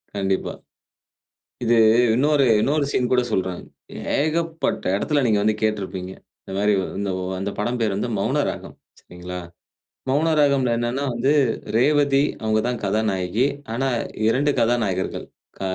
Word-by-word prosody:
கண்டிப்பா. 95 -1 -1 1.1
இது 120 0 +3 0.4
இன்னொரு 140 +2 +3 0.2
இன்னொரு 145 +2 +1
சீன் 125 0 0
கூட 125 -1 +4
சொல்றேன். 95 -2 -1 0.6
ஏகப்பட்ட 165 - -1
இடத்தில 145 +6 0
நீங்க 105 -2 +3
வந்து 110 0 +2
கேட்டிருப்பீங்க. 95 -3 -2 0.3
இந்த 95 - -9
மாரி 105 +1 +2 0.7
அந்த 100 +1 -2
படம் 120 +4 -1
பெயர் 105 -4 0
வந்து 120 - -2
"மௌன - - +1
ராகம்" - - -8 0.3
சரிங்களா. 90 +1 -8 0.7
மௌன 155 +4 +2
ராகம்ல 135 -4 +3
என்னென்னா 120 +4 -2
வந்து, 130 +5 +1 0.4
ரேவதி 140 +2 +3 0.2
அவங்க 110 0 +2
தான் 125 -2 -3
கதாநாயகி. 105 +2 0 0.3
ஆனா, 135 +3 0 0.4
2 140 +5 +2
கதாநாயகர்கள். 115 -6 0 0.3
க - - -10
120 Hz, 125 wpm, -22 LUFS, 100-140 Hz, 1.1 s, கூட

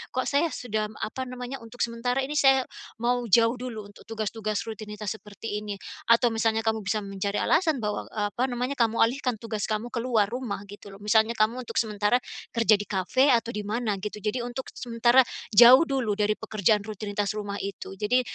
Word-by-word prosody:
Kok 255 - +1
saya 290 +4 +2
sudah 215 -4 -3
apa 260 +4 -4
namanya, 250 +1 -6
untuk 230 +2 -4
sementara 245 +3 -1
ini 285 - -4
saya 270 -1 +5 0.4
mau 245 +1 +2
jauh 230 +3 +5
dulu 225 -5 -6
untuk - - -18
tugas-tugas 215 -1 -3
rutinitas 210 -1 -6
seperti 210 +1 -6
ini. 210 -1 -5 0.3
Atau 235 +1 +5
misalnya 225 0 +1
kamu 220 0 +1
bisa 210 +1 -1
mencari 200 +1 -3
alasan 320 -4 +2
bahwa, 210 0 -2
eee, 205 -1 -2
apa 245 - -1
namanya, 250 +3 -2
kamu 230 -1 +2
alihkan 250 0 0
tugas 220 -3 -3
kamu 215 +2 -2
keluar 235 -3 +2
rumah 240 -4 -4
gitu 205 0 -11
loh, 195 - -11
misalnya 220 +2 +3
kamu 235 +4 +1
untuk - - -7
sementara 210 +1 +1 0.4
kerja 230 -2 +4
di 205 - -5
kafe 210 +8 +2
atau 235 0 +1
di 210 -3 -4
mana 215 -1 -1
gitu, 210 +1 -6
jadi 235 +4 -2
untuk 245 +2 -6
sementara 240 +1 +3 0.2
jauh 240 +5 +9
dulu 270 -9 0
dari 210 +1 0
pekerjaan 210 0 +1
rutinitas 205 -1 -3
rumah 205 -1 -4
itu. 195 -1 -6
Jadi, 245 +5 +2
225 Hz, 185 wpm, -26 LUFS, 210-245 Hz, 0.4 s, jauh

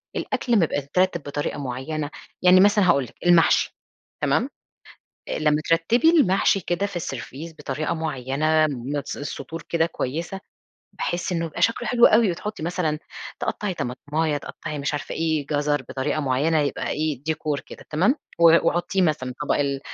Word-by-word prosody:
الأكل 240 - -2
لما 205 - +5
يبقى 145 - -1
مترتب 170 +3 0
بطريقة 145 +1 -3
معينة 145 +3 -4 0.3
يعني 180 0 +7
مثلًا 205 -1 +5
هاقول 140 -5 +4
لِك 120 - -12
المحشي، 175 -2 +4 0.5
تمام، - - +2 0.8
آآ، - - -2
لما 150 0 +2
ترتبي 220 - +4
المحشي 200 - +3
كده 175 +3 -1
في 200 - -8
السرفيس 150 +1 -6
بطريقة 150 +2 -2
معينة 155 0 +1
بنَفس 140 +1 -4
السطور 145 +3 -6
كده 165 -1 +2
كويسة، 170 +5 -4 0.6
باحس 175 +1 -2
إنه 170 -1 -1
يبقى 160 - -6
شكله 230 0 +1
حلو 240 0 +6
أوي 220 -2 +4
وتحطي 205 +1 -5
مثلًا 165 -3 -1 0.4
تقطَّعي 205 -3 -2
طماطماية، 150 +3 -2
تقطَّعي 150 +1 -6
مش 140 +1 -2
عارفة 145 - -4
إيه، 155 -3 0
جزر 145 0 0
بطريقة 135 +3 -1
معينة، 145 +4 +1
يبقى 145 - -2
إيه، 150 -4 -2
ديكور 155 -2 -2
كده - - -13
تمام، 185 - +2 0.2
و 165 0 +7
وحُطيه 175 +2 0
مثلًا 130 -7 0
طبق 150 - +1
ال 140 -1 0
155 Hz, 155 wpm, -24 LUFS, 145-175 Hz, 0.8 s, يعني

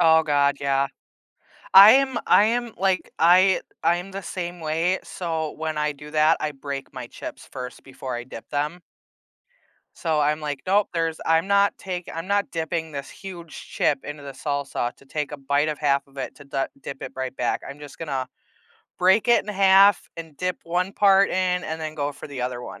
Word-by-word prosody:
Oh 160 -1 +6
god, 145 -2 +2
yeah. 140 0 +1 0.9
I 195 +3 +11
am 265 0 +3
I 210 - +6
am, 235 +1 0
like, 190 -1 0
I 185 +3 +5 0.2
I'm 175 +3 +1
the 195 +1 -5
same 175 -2 -5
way, 165 +4 0
so, 160 -3 -3
when 160 -1 -4
I 150 0 0
do 150 +1 -12
that, 155 +1 +4
I 150 - -1
break 140 0 -6
my 130 -2 -7
chips - - -9
first 125 -1 -7
before 130 -1 -7
I 120 - -5
dip 130 - -10
them. 150 +4 -2 1.2
So 160 -3 0
I'm 150 +1 +1
like, 145 -3 -4
"Nope, 200 +2 +3
there's 165 -1 -1
I'm 165 +2 +3
not 200 0 +3
tak 180 -2 -5
I'm 165 +2 -5
not 200 0 0
dipping 160 -1 -3
this 140 -1 -6
huge 175 -4 -10 0.2
chip 140 -2 0
into 145 0 -7
the 140 -1 -7
salsa 140 -3 -3
to - - -20
take 150 +1 -4
a - - -4
bite 140 +2 0
of 150 - -3
half 140 -2 +1
of 140 - -24
it 135 - -5
to 145 - -13
dah 135 -1 -2 0.2
dip 135 - -7
it - - -6
right 130 0 -4
back, - - 0
I'm 140 +1 -9
just 145 -1 -11
gonna 135 -5 -3 0.7
break 190 +5 +4
it 240 - +5
in 210 - -5
half 195 0 +5
and 160 -3 -9
dip 180 +2 -2
one 180 +3 -1
part 195 -1 +5
in 180 -1 0
and 160 +1 -4
then 155 -1 -4
go 145 -1 -2
for 140 - -10
the 140 -3 -6
other 125 -1 -3
one." - - -9
160 Hz, 205 wpm, -24 LUFS, 140-185 Hz, 1.2 s, I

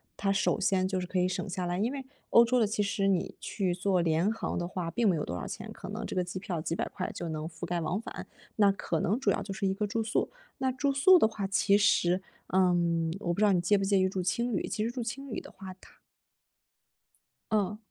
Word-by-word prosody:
它 195 -1 0
首 210 +1 +1
先 190 -1 +2
就 190 - -1
是 - - -3
可 185 +1 -1
以 180 - +3
省 185 - -3
下 180 -1 -3
来。 175 +1 -1
因 225 +5 0
为 275 -1 -5 0.2
欧 235 - +7
洲 250 +2 +2
的 230 - +4
其 210 0 -1
实 200 -1 0
你 185 -3 0
去 190 -4 -1
做 185 0 +1
廉 170 +5 +2
航 225 - -3
的 175 - -1
话 175 -1 -4
并 225 +3 +2
没 175 - +2
有 150 - -2
多 85 - -4
少 - - -5
钱， - - -7
可 - - -9
能 - - -4
这 - - -5
个 180 - +2
机 180 +1 -5
票 180 -4 -4
几 165 - -3
百 - - -2
块 185 - -4
就 170 - -5
能 155 -1 -4
覆 165 +1 -7
盖 175 0 -2
往 175 +6 -1
返。 - - -7 0.3
那 205 -2 +5
可 170 -4 -2
能 210 +7 +1
主 270 - +1
要 200 - -1
就 195 0 -5
是 195 0 -1
一 190 - +1
个 210 +2 -1
住 225 +2 -1
宿， 220 0 0 0.3
那 260 -1 +1
住 275 +2 0
宿 355 +7 +7
的 220 - +5
话， 215 -3 -4
其 200 +1 +3
实， 185 -3 +3 0.3
嗯， 170 -3 +2
我 175 -4 -1
不 - - -7
知 215 - +3
道 205 - +5
你 180 - +3
介 200 +4 +3
不 195 - -1
介 195 0 +3
意 185 - +3
住 190 -1 -3
青 235 +6 0
旅， - - -1
其 215 -1 -1
实 - - 0
住 240 0 -4
青 275 +4 -6
旅 220 - -4
的 - - -13
话 190 -1 -9
它 - - -18 1.5
嗯。 210 -1 +1
195 Hz, 285 characters per minute, -29 LUFS, 180-215 Hz, 1.5 s, 欧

